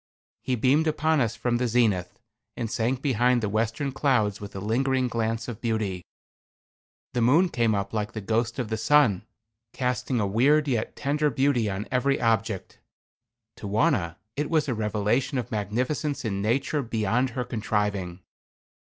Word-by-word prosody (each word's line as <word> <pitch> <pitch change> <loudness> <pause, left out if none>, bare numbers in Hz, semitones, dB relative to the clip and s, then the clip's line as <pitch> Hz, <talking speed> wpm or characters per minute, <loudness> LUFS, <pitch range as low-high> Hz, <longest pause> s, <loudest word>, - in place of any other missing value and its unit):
He 130 - -1
beamed 135 +7 +3
upon 155 -1 +2
us 115 -2 0
from 120 -1 0
the 125 +1 0
zenith, 110 -7 +1 0.4
and 115 -2 -3
sank 125 +4 -1
behind 125 -2 +3
the - - +1
western 115 +6 -1
clouds 115 -8 +1
with 100 -1 -8
a - - -4
lingering 130 +5 +1
glance 115 -1 -2
of 120 -4 -7
beauty. 110 -6 -1 1.1
The 120 - 0
moon 155 +10 +4
came 115 -7 +1
up 100 +1 -3
like 105 -1 -2
the 110 - -4
ghost 115 +4 -1
of 125 -5 -3
the 110 - -1
sun, 115 -5 +3 0.5
casting 125 -1 -1
a 105 - +1
weird 140 +9 +3
yet 120 -5 -1
tender 150 +2 0
beauty 135 -6 +1
on 95 +3 -4
every 135 +2 +1
object. 110 -3 -1 0.8
To 105 - -7
Wauna 105 - +1 0.2
it 145 +1 -2
was 155 -3 +2
a 130 - 0
revelation 110 +5 0
of 125 - -4
magnificence 125 +8 -2
in 100 -3 -2
nature 135 +7 0
beyond 115 +1 0
her 125 - 0
contriving. 105 -6 -2
115 Hz, 160 wpm, -26 LUFS, 105-130 Hz, 1.1 s, moon